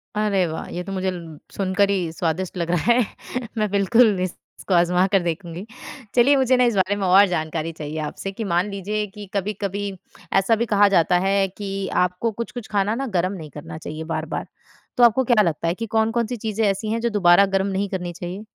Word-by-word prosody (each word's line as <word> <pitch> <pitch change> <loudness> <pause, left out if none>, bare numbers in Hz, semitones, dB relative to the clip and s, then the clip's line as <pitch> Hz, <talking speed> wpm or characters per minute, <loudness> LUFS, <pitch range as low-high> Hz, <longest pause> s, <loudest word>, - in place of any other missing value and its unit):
अरे 205 -3 +2
वाह! 160 0 -5
ये 180 - -4
तो 195 - -7
मुझे 190 -1 -1 0.4
सुनकर 195 +1 +1
ही 180 -5 0
स्वादिष्ट 175 +3 -2
लग 170 -1 -2
रहा 175 +7 +2
है। 240 -1 +4 0.5
मैं 215 -1 +1
बिल्कुल 205 +1 +4
इस 185 - 0 0.3
इसको 190 - -2
आजमा 180 +1 +4
कर 195 - +5
देखूँगी। 170 +2 -4 0.5
चलिए 255 +4 +5
मुझे 260 -1 +3
ना 250 - +4
इस 235 -3 +1
बारे 195 +1 +2
में 200 - -2
और 195 +3 +7
जानकारी 160 -2 -2
चाहिए 155 -1 -7
आपसे 155 +5 -5
कि 225 - -5
मान 180 +4 +1
लीजिए 205 +2 -3
कि 210 -1 -8
कभी-कभी 200 0 -2 0.5
ऐसा 195 +4 +3
भी 230 +2 -1
कहा 205 -2 +4
जाता 170 +1 +4
है 195 0 +2
कि 195 -1 -4 0.2
आपको 180 +6 -2
कुछ-कुछ 235 +1 -6
खाना 205 +1 +1
ना 270 +2 -3
गर्म 185 +3 0
नहीं 160 -6 -8
करना 150 +2 -9
चाहिए 155 0 -6
बार-बार। 155 0 -4 0.5
तो 245 - +5
आपको 240 +3 +5
क्या 235 -3 +4
लगता 165 -1 -1
है 170 - +2
कि 230 - -4
कौन-कौन 225 +1 +1
सी 245 +1 -4
चीजें 220 0 -2
ऐसी 200 +2 0
हैं 230 - 0
जो 235 - +1
दोबारा 195 -2 +5
गर्म 195 0 0
नहीं 195 +1 -1
करनी 180 -2 -4
चाहिए? 180 +5 -7
195 Hz, 210 wpm, -22 LUFS, 175-215 Hz, 0.5 s, और